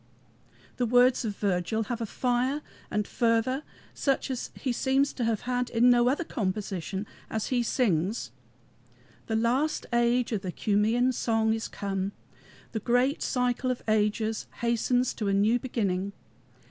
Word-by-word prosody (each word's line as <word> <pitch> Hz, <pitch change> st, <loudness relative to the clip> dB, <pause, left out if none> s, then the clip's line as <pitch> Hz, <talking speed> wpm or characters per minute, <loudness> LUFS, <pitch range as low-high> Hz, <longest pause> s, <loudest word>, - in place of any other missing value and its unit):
The 245 Hz, -, +1 dB
words 245 Hz, +2 st, +4 dB
of 210 Hz, -2 st, -2 dB
Virgil 200 Hz, +3 st, 0 dB
have 235 Hz, +2 st, -4 dB
a 225 Hz, -, -2 dB
fire 255 Hz, +6 st, 0 dB, 0.3 s
and 210 Hz, 0 st, 0 dB
fervor 235 Hz, +3 st, +1 dB, 0.3 s
such 275 Hz, -1 st, 0 dB
as 255 Hz, -, -3 dB
he 260 Hz, -, -2 dB
seems 270 Hz, +3 st, +1 dB
to 245 Hz, -, -3 dB
have 225 Hz, -2 st, 0 dB
had 250 Hz, 0 st, -1 dB
in 240 Hz, +2 st, +5 dB
no 240 Hz, 0 st, +4 dB
other 290 Hz, +6 st, 0 dB
composition, 195 Hz, -, -3 dB, 0.2 s
as 220 Hz, -1 st, -2 dB
he 250 Hz, -2 st, +2 dB
sings: 195 Hz, -, 0 dB, 1.0 s
"The 225 Hz, -, -1 dB
last 250 Hz, +7 st, +1 dB
age 240 Hz, +1 st, +2 dB
of 215 Hz, -4 st, -1 dB
the 185 Hz, -2 st, -4 dB
Cumæan 220 Hz, +7 st, +2 dB
song 225 Hz, -2 st, +1 dB
is 225 Hz, 0 st, -3 dB
come. 195 Hz, 0 st, -3 dB, 0.6 s
The 220 Hz, -, -2 dB
great 245 Hz, +6 st, +2 dB
cycle 250 Hz, 0 st, 0 dB
of 250 Hz, -, -2 dB
ages 215 Hz, 0 st, +1 dB
hastens 235 Hz, +2 st, +1 dB
to 210 Hz, -, -3 dB
a 200 Hz, -, +2 dB
new 215 Hz, +5 st, +3 dB
beginning. 200 Hz, -6 st, -1 dB
235 Hz, 150 wpm, -28 LUFS, 210-250 Hz, 1.0 s, in